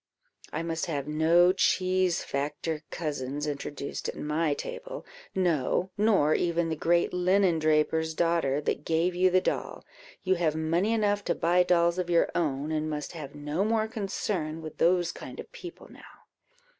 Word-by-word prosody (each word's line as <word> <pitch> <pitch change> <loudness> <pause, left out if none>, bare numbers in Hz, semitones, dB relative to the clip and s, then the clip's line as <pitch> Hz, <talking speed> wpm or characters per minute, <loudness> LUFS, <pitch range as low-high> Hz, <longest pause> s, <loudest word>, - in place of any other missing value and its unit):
I 160 - -3
must 165 -1 -2
have 145 -4 -3
no 165 +4 +4
cheese 185 -2 +1
factor 150 +3 -3
cousins 145 -2 -3
introduced 145 -1 -4
at - - -6
my 150 0 0
table; - - -7 0.3
no, 180 0 +1
nor 200 -8 +3
even 170 -1 +1
the 160 - -1
great 170 +2 +1
linen 180 -1 +3
draper's 155 +1 +1
daughter 165 -5 +1
that 145 - -2
gave 165 +3 +1
you 185 +1 +3
the 185 0 +3
doll; - - -3 0.4
you 190 -1 +2
have 160 -3 +1
money 165 +6 +1
enough 205 -2 +1
to - - 0
buy 175 +2 +3
dolls 170 0 +3
of 180 -1 -2
your 170 -1 +3
own, 150 -2 -1
and 155 0 -1
must 150 -1 -4
have 150 -4 -8
no 150 +5 -2
more 220 0 +1
concern 190 -7 -3
with 155 - -9
those 175 0 +3
kind - - -10
of - - -9
people 365 -9 -10
now." - - -16
170 Hz, 165 wpm, -28 LUFS, 155-185 Hz, 0.4 s, no